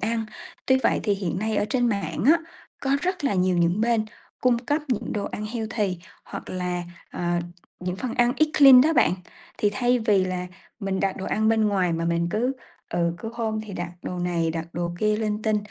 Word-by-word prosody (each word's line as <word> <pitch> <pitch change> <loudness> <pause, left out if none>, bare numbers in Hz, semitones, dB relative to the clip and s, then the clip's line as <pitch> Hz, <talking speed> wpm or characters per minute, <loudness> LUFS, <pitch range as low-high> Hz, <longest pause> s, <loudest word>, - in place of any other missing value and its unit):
ăn, 225 +2 -1 0.4
tuy 260 0 +4
vậy - - +3
thì 205 - +2
hiện 185 -3 -3
nay 215 +1 -1
ở - - +2
trên 245 0 +2
mạng 200 -1 -2
á, 325 +4 +7 0.4
có 270 - -2
rất 365 -4 -1
là 275 - +2
nhiều 185 -1 +2
những 175 +4 +2
bên 230 -1 +2 0.4
cung 250 -2 +3
cấp 290 +6 -1
những 245 -5 -1
đồ 205 -1 -2
ăn 215 - -4
healthy 215 -5 -2 0.3
hoặc - - -8
là, 180 -1 -2 0.3
ờ, 175 0 -1 0.4
những 180 0 -3
phần 245 +3 -4
ăn 240 0 +3
eat 310 0 +3
clean 270 -3 +10
đó 315 +4 +4
bạn. 235 - +4 0.5
Thì 205 - +2
thay 245 +3 +2
vì 205 -4 +3
là 180 -1 -3 0.3
mình 195 -1 -1
đặt 195 -1 0
đồ 190 - -5
ăn 220 +1 +1
bên 220 -1 +3
ngoài 185 -4 +1
mà 165 0 -1
mình 170 0 +1
cứ 245 +5 0 0.4
ừ, 170 -1 +1
cứ 225 - -5
hôm 220 -2 -2
thì 215 - -9
đặt 175 -1 -4
đồ 180 - -4
này, 170 -2 0
đặt 165 0 -3
đồ 175 0 -2
kia 215 0 +2
linh 215 -1 -2
tinh, 215 -1 +2
210 Hz, 220 wpm, -25 LUFS, 180-235 Hz, 0.5 s, clean